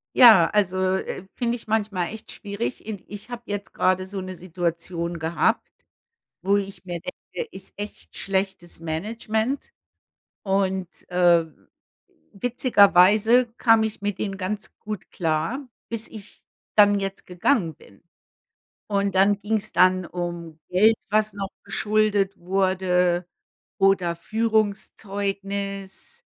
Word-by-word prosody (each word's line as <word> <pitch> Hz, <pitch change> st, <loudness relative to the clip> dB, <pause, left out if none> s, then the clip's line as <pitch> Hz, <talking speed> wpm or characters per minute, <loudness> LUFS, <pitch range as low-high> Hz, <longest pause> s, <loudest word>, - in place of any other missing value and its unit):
Ja, 220 Hz, -9 st, +9 dB
also, 190 Hz, -2 st, +2 dB
äh, 190 Hz, 0 st, -5 dB
finde 240 Hz, -1 st, 0 dB
ich 230 Hz, -, -11 dB
manchmal 205 Hz, -5 st, 0 dB
echt 220 Hz, 0 st, -8 dB
schwierig, 210 Hz, +2 st, -5 dB
i 205 Hz, -4 st, -5 dB
ich 205 Hz, +3 st, -10 dB
habe 240 Hz, -1 st, -7 dB
jetzt 205 Hz, -1 st, -5 dB
gerade 185 Hz, 0 st, +1 dB
so 195 Hz, 0 st, -5 dB
'ne 185 Hz, 0 st, -6 dB
Situation 170 Hz, -1 st, -3 dB
gehabt, 165 Hz, +7 st, +1 dB, 0.7 s
wo 200 Hz, +1 st, +3 dB
ich 195 Hz, -1 st, -5 dB
mir 175 Hz, -2 st, -5 dB
denke, 475 Hz, -, -7 dB
ist -, -, -10 dB
echt 205 Hz, 0 st, -8 dB
schlechtes 190 Hz, -3 st, -2 dB
Management 220 Hz, -, -2 dB, 0.7 s
und, 190 Hz, -2 st, 0 dB, 0.2 s
äh, 175 Hz, -2 st, +4 dB, 0.9 s
witzigerweise 220 Hz, 0 st, +5 dB
kam 225 Hz, -2 st, +5 dB
ich 215 Hz, -2 st, -3 dB
mit 205 Hz, -2 st, -2 dB
ihnen 195 Hz, -2 st, -3 dB
ganz 205 Hz, +2 st, -4 dB
gut 210 Hz, -3 st, -6 dB
klar, 165 Hz, -, -1 dB, 0.3 s
bis 230 Hz, -1 st, -2 dB
ich 210 Hz, -2 st, -12 dB, 0.3 s
dann 205 Hz, -1 st, +6 dB
jetzt 195 Hz, 0 st, -5 dB
gegangen 180 Hz, -, +1 dB
bin. 100 Hz, -, -20 dB, 0.9 s
Und, 200 Hz, -1 st, 0 dB
dann 200 Hz, +2 st, +4 dB
ging‘s 215 Hz, 0 st, -2 dB
dann 185 Hz, 0 st, +4 dB
um 170 Hz, -2 st, -5 dB
Geld, 215 Hz, +5 st, +5 dB
was 215 Hz, 0 st, +2 dB
noch 195 Hz, -1 st, -5 dB
geschuldet 210 Hz, -2 st, +1 dB
wurde, 180 Hz, -1 st, +1 dB, 0.5 s
oder 190 Hz, -3 st, +3 dB
Führungszeugnis, 200 Hz, -, -2 dB
195 Hz, 120 wpm, -24 LUFS, 180-215 Hz, 0.9 s, Ja